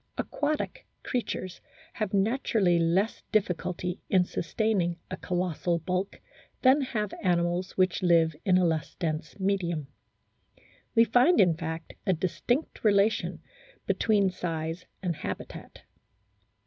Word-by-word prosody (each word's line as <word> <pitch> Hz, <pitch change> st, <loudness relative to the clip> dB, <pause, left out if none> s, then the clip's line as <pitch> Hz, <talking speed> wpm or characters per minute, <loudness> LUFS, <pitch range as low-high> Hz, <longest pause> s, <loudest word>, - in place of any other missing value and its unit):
Aquatic 305 Hz, +11 st, -2 dB, 0.2 s
creatures 185 Hz, -7 st, -3 dB, 0.3 s
have 215 Hz, -4 st, -2 dB
naturally 200 Hz, -4 st, +2 dB
less 175 Hz, +6 st, +1 dB
difficulty 180 Hz, -3 st, -1 dB
in 185 Hz, -2 st, +4 dB
sustaining 180 Hz, -1 st, 0 dB
a 185 Hz, -, -3 dB
colossal 175 Hz, -1 st, -1 dB
bulk 185 Hz, +4 st, -3 dB, 0.4 s
than 265 Hz, +3 st, +6 dB
have 215 Hz, -6 st, -2 dB
animals 175 Hz, 0 st, 0 dB
which 185 Hz, -2 st, +2 dB
live 165 Hz, -3 st, +4 dB
in 185 Hz, -2 st, +4 dB
a 185 Hz, -, +3 dB
less 160 Hz, -3 st, -1 dB
dense 155 Hz, 0 st, -3 dB
medium. 180 Hz, -6 st, 0 dB, 1.1 s
We 230 Hz, -, +7 dB
find, 250 Hz, +9 st, +4 dB
in 175 Hz, -4 st, +5 dB
fact, 160 Hz, 0 st, -5 dB
a 190 Hz, -, +4 dB
distinct 190 Hz, -, -2 dB
relation 205 Hz, 0 st, +2 dB, 0.4 s
between 205 Hz, -4 st, +2 dB
size 165 Hz, -1 st, -4 dB, 0.2 s
and 175 Hz, -3 st, -1 dB
habitat. -, -, -7 dB
185 Hz, 115 wpm, -28 LUFS, 170-210 Hz, 1.1 s, We